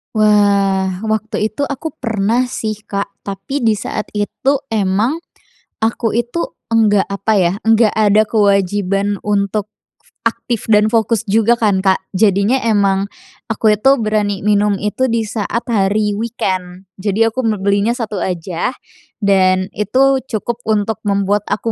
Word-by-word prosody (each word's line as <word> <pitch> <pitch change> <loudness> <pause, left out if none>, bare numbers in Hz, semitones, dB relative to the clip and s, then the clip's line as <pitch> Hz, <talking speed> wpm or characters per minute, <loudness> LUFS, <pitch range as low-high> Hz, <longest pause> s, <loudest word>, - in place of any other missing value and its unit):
Wah. 200 -2 +2
Waktu 220 0 -1
itu 285 +6 -2
aku 295 +3 -4
pernah 230 +2 0
sih, 220 -3 -4
Kak. 200 0 -3
Tapi 200 +8 -4
di 220 -2 +3
saat 210 +1 -4
itu 265 +7 0
emang 215 - +1 0.6
aku 225 0 0
itu 240 +9 -1 0.2
enggak, 215 -3 +3
apa 200 +2 -1
ya, 175 -1 +2
nggak 225 -1 +4
ada 215 0 +3
kewajiban 200 -1 +1
untuk 205 0 -1 0.6
aktif 230 0 -3
dan 215 0 +4
fokus 230 -1 +1
juga 225 +2 +3
kan, 210 -5 +1
Kak. 190 0 0
Jadinya 200 +5 +2
emang 200 -4 +1 0.4
aku 220 -1 +2
itu 240 +7 +4
berani 210 -4 -1
minum 210 -1 +2
itu 210 +6 -1
di 230 -2 0
saat 220 +2 -3
hari 210 0 +1
weekend. 190 -4 -3 0.2
Jadi 205 +3 +1
aku 225 +3 -1 0.2
belinya 200 +4 +2
satu 220 -5 -4
aja, 180 +5 -3 0.5
dan 185 -1 +3
itu 265 +6 +2
cukup 235 0 -3
untuk 215 -1 0
membuat 200 +1 0
aku 215 +3 -1
210 Hz, 135 wpm, -17 LUFS, 200-225 Hz, 0.6 s, nggak